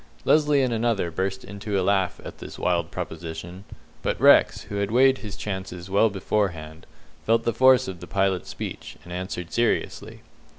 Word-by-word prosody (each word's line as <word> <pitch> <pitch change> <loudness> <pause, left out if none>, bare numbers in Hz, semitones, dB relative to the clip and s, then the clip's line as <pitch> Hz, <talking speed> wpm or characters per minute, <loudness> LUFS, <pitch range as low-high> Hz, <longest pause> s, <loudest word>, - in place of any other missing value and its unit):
Lesly 150 -2 +4
and 125 - -1
another 110 -6 0
burst 95 +3 -3
into 100 0 -3
a - - 0
laugh 95 -2 +1
at - - -9
this - - -9
wild 85 -2 0
proposition, 85 +4 -7 0.4
but - - -2
Rex, - - +5
who 100 - -6
had 100 0 -1
weighed 130 +3 +4
his 105 -3 -7
chances 95 -2 -6
well 100 +3 +4
beforehand, 90 -5 -3 0.4
felt 115 +1 +2
the 115 - 0
force 130 +2 +5
of 95 -2 -6
the - - -10
pilot's 95 -2 0
speech, - - -7
and 90 +2 -9
answered 90 -1 -5
seriously. 120 0 -1
100 Hz, 170 wpm, -25 LUFS, 90-115 Hz, 0.4 s, Rex